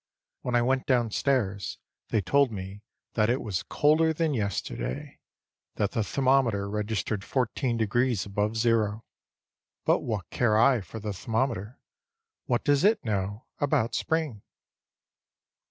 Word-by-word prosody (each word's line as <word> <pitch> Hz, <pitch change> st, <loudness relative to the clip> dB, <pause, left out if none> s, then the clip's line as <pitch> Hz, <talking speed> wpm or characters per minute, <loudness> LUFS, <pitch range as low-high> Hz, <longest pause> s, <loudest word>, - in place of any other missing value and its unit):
When 125 Hz, -, -1 dB
I 120 Hz, -, +4 dB
went 130 Hz, +1 st, +1 dB
downstairs 120 Hz, -4 st, +1 dB, 0.3 s
they 110 Hz, -, +2 dB
told 140 Hz, +3 st, +3 dB
me 95 Hz, 0 st, -7 dB, 0.3 s
that 110 Hz, -1 st, +2 dB
it 125 Hz, +2 st, +2 dB
was 95 Hz, -5 st, -2 dB
colder 155 Hz, -, +3 dB
than 160 Hz, -1 st, 0 dB
yesterday; 65 Hz, -, -3 dB, 0.6 s
that 105 Hz, -1 st, 0 dB
the 115 Hz, -, 0 dB
thermometer 130 Hz, -5 st, +2 dB
registered 105 Hz, -1 st, -2 dB
14 125 Hz, 0 st, -1 dB
degrees 115 Hz, -1 st, +1 dB
above 105 Hz, +2 st, -1 dB
zero. 115 Hz, -2 st, +1 dB, 0.8 s
But -, -, +4 dB
what 105 Hz, -5 st, -3 dB
care 110 Hz, -3 st, +2 dB
I 125 Hz, 0 st, +5 dB
for 95 Hz, +5 st, -8 dB
the 105 Hz, -1 st, -4 dB
thermometer? 115 Hz, +1 st, -2 dB, 0.7 s
What 120 Hz, -1 st, +1 dB
does 145 Hz, -1 st, +3 dB
it 210 Hz, -, +3 dB
know 100 Hz, +1 st, -2 dB
about 135 Hz, -6 st, +1 dB
spring? 155 Hz, -10 st, -1 dB
115 Hz, 130 wpm, -27 LUFS, 105-130 Hz, 0.8 s, I